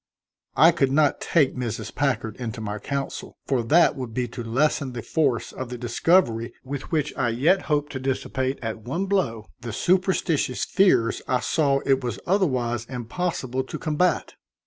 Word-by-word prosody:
I - - +8
could 135 -1 +1
not 145 0 +2
take 150 -6 +2
Mrs. 115 -4 -4
Packard 125 -6 -1
into 120 -2 -5
my 105 -1 -4
counsel, 140 +5 -4
for 130 -3 +1
that 150 +8 +4
would 125 -5 -6
be 125 -1 0
to 120 - -7
lessen 130 +3 0
the 120 -2 -5
force 130 -8 0
of 130 -2 -6
the 125 - -5
discovery 120 -1 +2
with 135 +1 -6
which 150 -3 0
I 120 - +1
yet 155 +12 +3
hoped 145 -1 +1
to 130 - -4
dissipate 130 0 -2
at 115 -1 -3
one 155 - -2
blow 150 - 0
the 120 -1 -6
superstitious 175 - +1
fears 185 - +3
I 125 - +2
saw 140 -3 +1
it 135 -1 +2
was 120 - -3
otherwise 130 - +1
impossible 130 +1 -3
to - - -6
combat. 160 +1 0
130 Hz, 170 wpm, -24 LUFS, 120-150 Hz, -, I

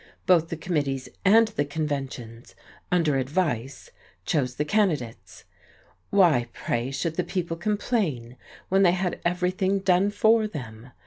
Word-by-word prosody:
Both 170 -3 +4
the 165 - -4
committees 145 -6 -2
and 220 +3 +5
the 175 -9 -1
conventions 135 -6 -5 0.4
under 165 -6 +2
advice 135 -2 -2 0.3
chose 125 -5 0
the 150 - -1
candidates. 155 - -1 0.7
Why, 170 -12 +4
pray, 120 +2 -2
should 160 +4 -3
the 180 - +1
people 175 -3 -3
complain, 175 - -2 0.3
when 195 +1 +2
they 180 -3 +5
had 180 -1 -2
everything 185 +2 0
done 190 0 +2
for 220 +2 +3
them? 120 - -9
165 Hz, 130 wpm, -25 LUFS, 135-190 Hz, 0.7 s, and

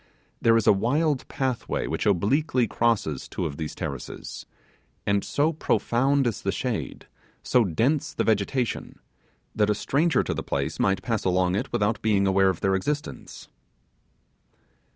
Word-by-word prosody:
There 115 0 +5
is 115 - +1
a - - +7
wild 135 +8 0
pathway 130 -3 -2
which 80 +8 -2
obliquely 120 - +2
crosses 110 - 0
two - - -4
of 70 - -4
these 80 -2 -5
terraces; 70 -3 -6 0.6
and 100 0 +1
so 155 +3 +1
profound 135 -2 +1
is 115 -4 -1
the - - 0
shade, - - -4 0.4
so 125 - +3
dense 115 - 0
the - - -1
vegetation, 110 +4 -1 0.6
that 105 -1 +2
a 105 - +2
stranger 145 +4 +1
to - - -2
the - - -3
place - - -3
might 95 -1 +1
pass 115 -2 -1
along 90 -1 +2
it 100 - -2
without 105 +2 0
being 105 -3 +2
aware 95 0 +4
of 95 - -3
their 95 - +2
existence. 145 +11 -4
110 Hz, 155 wpm, -25 LUFS, 95-130 Hz, 0.6 s, a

